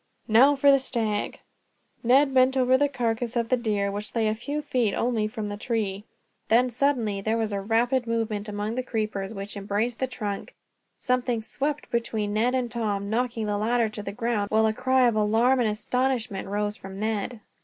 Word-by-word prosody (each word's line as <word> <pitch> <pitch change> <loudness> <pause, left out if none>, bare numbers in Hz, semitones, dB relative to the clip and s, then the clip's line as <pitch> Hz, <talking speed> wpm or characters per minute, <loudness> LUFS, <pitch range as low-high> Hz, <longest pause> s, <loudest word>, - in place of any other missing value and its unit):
"Now 255 +6 +6
for 280 +1 +5
the 275 - +5
stag." 220 -5 -2 0.6
Ned 270 +3 +4
bent 260 +1 +4
over 255 0 +4
the 285 +2 +3
carcass 240 -2 -2
of 235 -1 0
the 255 - +4
deer, 210 -4 -1
which 205 +2 -6
lay 225 -2 +2
a 215 - +2
few 285 +7 -4
feet 240 -7 0
only 230 -3 0
from 215 0 -5
the 205 0 -5
tree. 210 -3 -2 0.4
Then 245 +2 +3
suddenly 235 -6 0
there 220 +3 0
was 220 -2 -1
a 200 - -1
rapid 235 +4 +1
movement 220 -2 -2
among 210 +1 -3
the 255 - -1
creepers 215 -5 -3
which 200 -1 -6
embraced 205 +4 -2
the 260 - 0
trunk, 210 -5 -5 0.4
something 250 -3 0
swept 290 +6 -3
between 220 -3 -1
Ned 240 +4 +2
and 245 -2 -1
Tom, 205 -4 -2
knocking 235 -1 -1
the 205 -1 -1
latter 230 +1 +1
to 210 0 -7
the 200 - -5
ground, 225 -2 -1
while 220 0 +3
a 220 - +2
cry 260 +2 +3
of 235 - +1
alarm 225 +5 +3
and 230 -3 +2
astonishment 235 -2 -1
rose 205 +1 -1
from 195 0 -9
Ned. 220 +2 -2
225 Hz, 195 wpm, -26 LUFS, 210-250 Hz, 0.6 s, Now